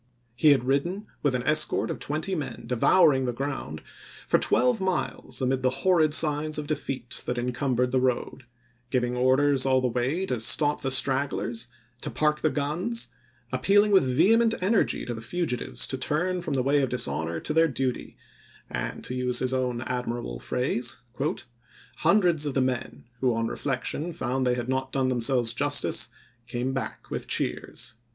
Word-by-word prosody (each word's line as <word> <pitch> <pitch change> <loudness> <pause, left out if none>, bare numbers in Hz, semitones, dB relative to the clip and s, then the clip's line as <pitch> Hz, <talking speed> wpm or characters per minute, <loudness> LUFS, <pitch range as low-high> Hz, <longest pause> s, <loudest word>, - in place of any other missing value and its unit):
He 150 +5 +4
had 140 -4 +4
ridden, 170 +10 -1 0.2
with 140 -3 +1
an 125 - -2
escort 155 +3 +2
of - - -5
twenty 155 +6 -3
men, 155 -8 -4
devouring 130 +2 +4
the 125 - -1
ground, 140 +4 -5 0.4
for - - +3
twelve 245 -5 +2
miles 185 -6 -2
amid 130 +1 +1
the 130 - +3
oct.iMse*. 130 - -5
horrid 165 -5 +4
signs 155 0 +3
of 150 - -3
defeat 135 -5 -3
that 125 - -1
incumbered 125 0 0
the 130 - +2
road: 130 0 -1 0.4
giving 125 0 0
orders 130 +2 +3
all 130 -1 +3
the 130 - +1
way 125 +10 -1
to 125 -9 -2
stop 145 +6 +3
the 135 - -1
stragglers, 130 -3 0 0.3
to - - -4
park 150 0 +1
the 155 - +3
guns; 170 +12 -2 0.4
appealing 205 +1 +3
with 165 -10 +4
vehement 225 +6 +4
energy 200 +3 +1
to 120 - -3
the 110 - -7
fugitives 160 0 -2
to 130 - -3
turn 175 +6 0
from 160 - -3
the 130 - +1
way 140 +2 +3
of 135 - 0
dishonor 85 -9 -1
to 150 - -3
their 165 +1 +4
duty; 130 -3 -3 0.5
and - - -4
to - - -4
use 125 -1 0
his 130 +1 +1
own 125 -2 -1
admirable 120 - -4
phrase, 125 - -2 0.5
" 120 -1 -36 0.3
Hundreds 170 -3 +3
of 140 - -3
the - - +3
men, 130 -2 -2 0.2
who 125 -3 +1
on 115 0 0
reflection 145 +7 -3
found 130 -5 -1
they 125 - +2
had 120 -1 -4
not 130 0 -2
done 130 -1 +1
themselves 120 -1 +1
justice, 145 +3 +2 0.4
came 125 +2 -2
back 135 - -5
with - - -4
cheers." - - -3
130 Hz, 175 wpm, -26 LUFS, 125-155 Hz, 0.5 s, He